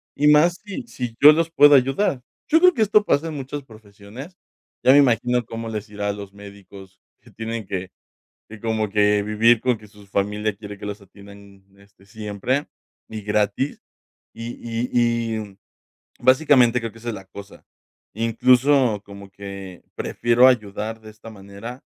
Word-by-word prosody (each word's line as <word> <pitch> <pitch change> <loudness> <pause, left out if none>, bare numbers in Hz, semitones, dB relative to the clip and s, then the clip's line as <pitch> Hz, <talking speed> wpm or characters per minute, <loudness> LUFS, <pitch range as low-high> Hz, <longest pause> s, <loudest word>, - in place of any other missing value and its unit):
y 150 - +2
más 155 +4 +5
si 210 +5 -7
si 120 - -6
yo 150 - +10
los 165 +1 -1
puedo 145 -2 +7
ayudar, 135 +1 +1 0.3
yo 320 +1 +5
creo 365 +1 +6
que 235 - -2
esto 210 0 +3
pasa 155 -2 +1
en 155 - -6
muchas 140 +1 -6
profesiones, 110 - -13 0.5
ya 130 - +6
me - - +6
imagino 125 -2 +2
cómo 115 +1 -6
les 105 -1 -6
irá 105 0 -4
a - - -1
los 100 -1 -10
médicos 100 -1 -14 0.2
que - - -19
tienen 115 -1 -5
que 95 -1 -5 0.6
que 110 0 -11
como 110 -1 -2
que 105 0 +2
vivir 110 +3 +3
con 125 -1 +1
que 105 0 -16
su 105 -1 -18
familia 105 +1 -2
quiere 105 0 -10
que 105 - -9
los 105 0 -6
atiendan 100 0 -16 0.2
este 100 -1 -23
siempre 105 +7 -3 0.4
y 110 -1 -6
gratis 105 +6 -1 0.5
y 115 +1 -7
y 115 +1 -4
y 115 -4 -1 0.6
básicamente 130 -3 +4
creo 115 -1 -5
que 115 - -16
esa 120 - -6
es 115 - -2
la 95 -2 -10
cosa, 100 +1 -13 0.5
incluso 125 +1 +2
como 100 -1 -12
que 100 -3 -9
prefiero 120 +2 +3
ayudar 110 -2 -2
de 110 0 -12
esta 110 +1 -14
manera, 105 +5 -10
110 Hz, 170 wpm, -22 LUFS, 100-125 Hz, 0.6 s, yo